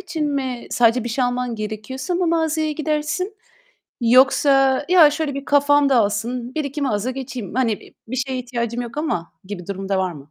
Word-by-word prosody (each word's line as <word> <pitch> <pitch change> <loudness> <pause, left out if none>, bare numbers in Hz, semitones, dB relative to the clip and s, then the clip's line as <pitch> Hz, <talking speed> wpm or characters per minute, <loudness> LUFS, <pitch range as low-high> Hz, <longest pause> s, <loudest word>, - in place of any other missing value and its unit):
için 330 -5 -3
mi 260 -3 -3
sadece 235 0 +3
bir - - -3
şey 250 +3 0
alman 245 -1 -1
gerekiyorsa 220 - -4
mı 360 0 +1
mağazaya 320 -2 +1
gidersin 310 +6 -2 0.7
yoksa, 270 +3 +4
"Ya, 335 -5 +7
şöyle 300 -1 -2
bir 275 0 -5
kafam 285 0 +4
dağılsın, 235 +2 0
1-2 295 -1 -3
mağaza 250 -3 0
geçeyim. 255 -6 -6
Hani, 255 -3 +2
e 210 - -7
bir 255 - -4
şeye 260 0 -2
ihtiyacım 240 -1 -3
yok 240 +2 -8
ama." 180 - -2
gibi 185 -2 -8
durum 195 0 -5
da 195 - +1
var 185 -1 0
mı? 155 - -10
260 Hz, 180 wpm, -21 LUFS, 230-295 Hz, 0.7 s, Ya